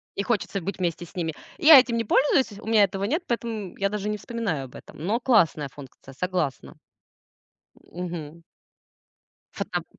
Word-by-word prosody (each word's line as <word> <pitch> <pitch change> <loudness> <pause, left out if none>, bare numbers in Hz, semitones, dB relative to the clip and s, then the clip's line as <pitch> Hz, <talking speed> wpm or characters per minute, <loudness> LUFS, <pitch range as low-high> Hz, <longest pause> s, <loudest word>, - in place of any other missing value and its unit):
И 200 - -1
хочется 200 -3 -1
быть 195 +4 -4
вместе 175 -1 -2
с - - -19
ними. 165 -3 -2 0.2
Я 310 -5 +9
этим 240 -2 +1
не 230 - -1
пользуюсь, 260 -5 +2
у 220 - -11
меня 220 -2 +5
этого 195 0 -1
нет, 320 - -1
поэтому 225 -5 -3
я 200 0 +1
даже 210 0 -3
не 210 0 -1
вспоминаю 210 - -3
об 125 - -15
этом. - - -12
Но 210 +9 0
классная 170 - +3
функция, 135 -1 -13
согласна. 175 -3 -3 1.0
Мгм. 170 -2 -7 1.1
Фотоп - - -3
200 Hz, 160 wpm, -25 LUFS, 170-230 Hz, 1.1 s, Я